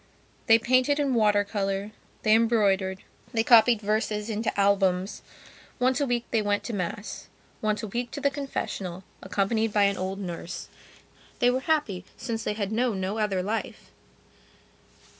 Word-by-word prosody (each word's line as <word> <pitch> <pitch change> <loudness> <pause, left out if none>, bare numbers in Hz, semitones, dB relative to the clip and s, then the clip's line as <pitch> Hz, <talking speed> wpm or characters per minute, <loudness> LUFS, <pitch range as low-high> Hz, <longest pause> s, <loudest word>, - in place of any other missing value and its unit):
They 225 -1 +8
painted 255 +5 +2
in 280 -2 +1
water 210 -3 +3
colour; 200 0 -2 0.3
they 215 - +4
embroidered; 205 -4 +2 0.3
they 225 -1 +2
copied 230 -1 +6
verses 210 +1 -1
into 220 -1 -2
albums. 195 -1 +2 0.6
Once 255 +3 +2
a 285 - +1
week 240 -1 0
they 225 - +2
went 205 0 0
to 240 - -5
Mass; 200 +1 -4 0.3
once 215 +1 0
a - - -3
week 240 +4 -3
to 285 - -6
the 280 0 +1
confessional, 195 -10 -4 0.2
accompanied 210 +3 0
by 205 0 +3
an 200 0 +2
old 190 +1 -3
nurse. 175 -2 -6 0.7
They 245 -2 +4
were 255 - 0
happy 265 - 0
since 225 -2 -4
they 210 - -1
had 205 -1 -3
known 230 -3 0
no 190 +4 -2
other 195 -4 0
life. 215 +4 -4
215 Hz, 160 wpm, -26 LUFS, 195-235 Hz, 0.7 s, They